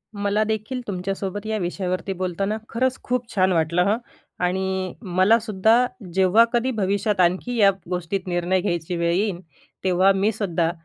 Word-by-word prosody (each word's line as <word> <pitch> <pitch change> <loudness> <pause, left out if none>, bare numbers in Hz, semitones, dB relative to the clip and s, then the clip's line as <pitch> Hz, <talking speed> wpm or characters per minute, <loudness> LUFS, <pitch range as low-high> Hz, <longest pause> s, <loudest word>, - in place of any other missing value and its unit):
मलादेखील 215 +4 -1
तुमच्यासोबत 195 +2 -4
या 220 0 -1
विषयावरती 185 +1 -2
बोलताना 190 +3 -2
खरंच 255 +2 0
खूप 250 -1 -2
छान 185 0 +3
वाटलं 170 +1 +2
हं 215 - +2 0.5
आणि 190 0 -1
मलासुद्धा 220 +4 +3 0.3
जेव्हा 190 +5 +5
कधी 245 +2 +1
भविष्यात 200 +1 0
आणखी 185 +8 +1
या 200 -2 +6 0.2
गोष्टीत 180 +1 -3
निर्णय 175 +1 0
घ्यायची 175 -2 -2
वेळ 170 0 +1
येईल, 195 -1 0 0.4
तेव्हा 185 +1 +4
मीसुद्धा, 195 -5 0
190 Hz, 135 wpm, -23 LUFS, 180-215 Hz, 0.5 s, या